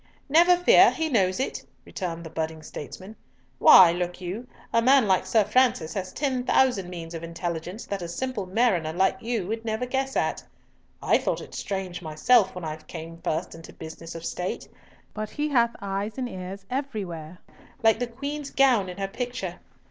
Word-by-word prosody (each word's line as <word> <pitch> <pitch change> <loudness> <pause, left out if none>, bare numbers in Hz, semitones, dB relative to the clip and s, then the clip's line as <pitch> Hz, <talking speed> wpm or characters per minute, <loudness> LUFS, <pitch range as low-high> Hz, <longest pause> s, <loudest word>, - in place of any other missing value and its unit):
"Never 345 +4 +6
fear! 360 +8 +7
he 320 -1 -2
knows 190 -7 +2
it," 265 - -2 0.2
returned 170 -3 -5
the 160 - -9
budding 160 -1 -4
statesman. 185 +8 -9 0.4
"Why, 185 - +9
look 175 +1 -3
you, 190 +7 -5 0.3
a 230 - +4
man 260 -1 +5
like 190 -1 +2
Sir 220 -2 +4
Francis 225 -8 +2
has 185 -2 -4
ten 265 -4 -1
thousand 245 -8 +2
means 170 -2 -7
of 165 - -5
intelligence 170 +4 -5
that 200 -2 -4
a 175 - -4
simple 215 +2 -3
mariner 185 -6 +1
like 190 +2 +1
you 230 -4 -2
would 225 +3 -4
never 220 +2 -2
guess 265 +1 -2
at. - - 0 0.6
I - - +4
thought - - -1
it - - -11
strange 190 -3 -4
myself 190 +6 +3
when 180 -2 -6
I 155 0 -4
came 165 +1 -9
first 160 +3 -2
into 165 0 -11
business 165 +1 -9
of 165 0 -7
State, 180 +1 -4 0.5
but 215 0 -4
he 300 0 -2
hath 235 -4 +2
eyes 200 +3 -3
and 255 -1 -2
ears 190 -1 -7
everywhere, 190 - -4 0.5
like 225 0 +5
the 245 - -1
Queen's 280 +4 -5
gown 250 -10 +3
in 180 - -8
her 195 -1 -2
picture. 245 +5 -5
195 Hz, 180 wpm, -26 LUFS, 175-245 Hz, 0.6 s, Why